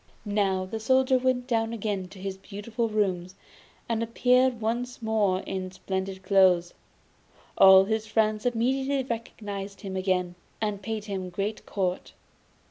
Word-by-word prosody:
Now, 195 -2 0
the 220 +4 -5
Soldier 260 +3 +3
went 255 -1 +1
down 225 -2 0
again 205 -4 -3
to 195 - -14
his 190 0 -4
beautiful 220 +4 -4
rooms, 190 -4 -1 0.5
and 230 -1 -1
appeared 250 +2 +2
once 240 +3 -2
more 215 -5 +1
in 185 -1 -4
splendid 190 0 -4
clothes. 185 -3 +4 0.8
All 190 0 +8
his 220 +1 -1
friends 215 0 +1
immediately 265 +3 0
recognised 205 -4 -6
him 195 -3 -5
again, 185 -2 0 0.3
and 210 -2 -2
paid 215 +1 -4
him 190 -3 -4
great 200 +4 -4
court. 185 -3 -2
210 Hz, 135 wpm, -27 LUFS, 190-230 Hz, 0.8 s, All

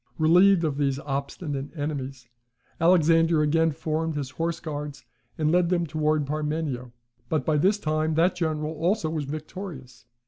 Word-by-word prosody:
Relieved 175 +3 +5
of 150 -3 -1
these 140 -2 +1
obstinate 140 0 -4
enemies, 135 -4 -4 0.5
Alexander 165 -2 +4
again 165 +2 +3
formed 160 +1 -2
his 140 -3 -4
horse 165 +4 -2
guards, 150 -2 -6 0.3
and 155 -1 +1
led 175 0 +3
them 175 -2 +1
towards 155 -1 0
Parmenio; 150 -4 -3 0.4
but 155 - 0
by 155 - +2
this 190 +8 +3
time 155 -3 0
that 170 +3 +3
general 155 -3 -2
also 170 +2 0
was 155 -3 -2
victorious. 155 -3 -8
155 Hz, 145 wpm, -26 LUFS, 145-165 Hz, 0.5 s, Relieved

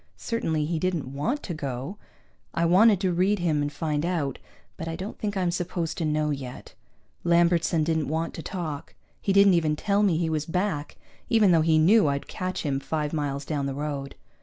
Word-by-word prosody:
Certainly 165 -10 -1
he 160 +1 -1
didn't 160 -7 -2
want 235 - -2
to 175 - -4
go. 140 +4 -5 0.6
I 170 - +2
wanted 195 +4 +5
to 185 -3 +1
read 190 +4 +2
him 165 -5 +1
and 145 0 -1
find 150 -1 -2
out, 165 -7 -1 0.4
but 165 - -6
I 165 - -3
don't 190 +5 -7
think 205 -2 -2
I'm 180 -2 +1
supposed 170 -2 -2
to 165 - 0
know 150 0 +1
yet. 130 -3 -7 0.5
Lambertson 170 -1 +3
didn't 160 -1 0
want 160 +2 -2
to - - -6
talk. 160 -6 -5 0.3
He 200 - 0
didn't 200 0 +6
even 160 -3 +2
tell 200 +5 +1
me 190 -6 +3
he 165 0 0
was 155 -1 -1
back, 175 -4 -2 0.3
even 220 -5 +5
though 165 -2 +5
he 160 0 +3
knew 195 +5 +5
I'd 140 0 -1
catch 185 0 -4
him 140 -3 0
five 150 +1 -2
miles 145 -2 -2
down 145 -3 -2
the 135 - -3
road. 140 -1 -4
165 Hz, 200 wpm, -26 LUFS, 150-185 Hz, 0.6 s, didn't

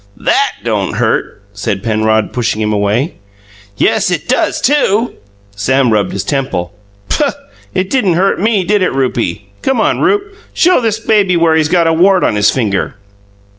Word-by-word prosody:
"THAT - - +1
don' - - -1
hurt," 100 - -1
said 100 -1 -3
Penrod, 110 -1 0
pushing 120 -3 -1
him 105 0 0
away. 105 - -1 0.6
"Yes, - - +2
it - - -2
does, - - 0
too!" 245 -5 +1 0.4
Sam 125 +4 +1
rubbed 105 -2 +1
his 100 - -3
temple. 130 -11 -2 0.3
"Puh! 290 -2 0 0.4
It 185 0 -1
didn't 210 -10 +2
hurt 190 +3 +1
me, 210 -1 +1
did 205 +2 +1
it, 185 - +1
Rupie? 110 -7 -2
Come 265 -3 0
on 220 - +1
in, - - -4
Rupe: 410 +1 0 0.2
show 355 -4 +3
this 225 -2 -1
baby 205 -5 +2
where 165 -1 +3
he's 160 -1 +2
got 170 -1 +2
a 165 - +2
wart 185 +3 +3
on - - +2
his 105 -1 +3
finger." 105 -7 -1
160 Hz, 170 wpm, -13 LUFS, -, 0.6 s, show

